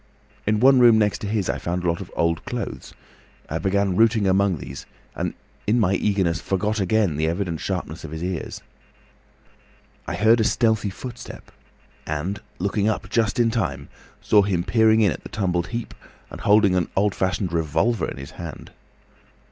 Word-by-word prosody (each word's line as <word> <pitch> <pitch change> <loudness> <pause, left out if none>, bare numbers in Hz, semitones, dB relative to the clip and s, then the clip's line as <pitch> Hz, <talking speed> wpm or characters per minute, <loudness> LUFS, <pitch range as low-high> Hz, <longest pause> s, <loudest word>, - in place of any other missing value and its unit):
In 105 0 +2
one 130 +2 +6
room 120 -2 +7
next 105 -2 +1
to 105 - -5
his 105 -2 -1
I - - -1
found 90 +1 -3
a - - 0
lot 85 0 0
of - - -9
old 85 -2 0
clothes. - - -6 0.5
I 80 - -3
began 100 0 +1
routing 110 0 +3
among 95 -1 +2
these, 65 0 -9 0.3
and - - -3 0.3
in 115 +4 +3
my 95 -4 +2
eagerness 95 -4 +1
forgot 105 +3 -1
again 95 -4 +1
the 80 +1 +1
evident 85 -1 -2
sharpness 90 -4 -4
of 80 - -7
his 80 +2 -6
ears. 90 -2 -4 1.4
I - - -2
heard 110 +3 +4
a - - +3
stealthy 110 -2 +1
footstep 120 +4 -9 0.6
and, 85 +7 -3 0.2
looking 100 +3 0
up 110 - -3
just 115 0 +1
in 115 -1 +3
time, 70 - -2 0.3
saw 105 - +5
him 95 -4 0
peering 110 +4 +4
in 100 -4 +4
at 65 - -6
the - - -10
tumbled 90 -4 -1
heap 120 0 -5 0.4
and - - -8
holding 105 -2 +4
an 90 -3 0
old 100 0 +2
fashioned 95 -1 -1
revolver 85 +6 +1
in - - -8
his 70 +2 -8
hand. 85 -3 -9
100 Hz, 180 wpm, -23 LUFS, 85-110 Hz, 1.4 s, room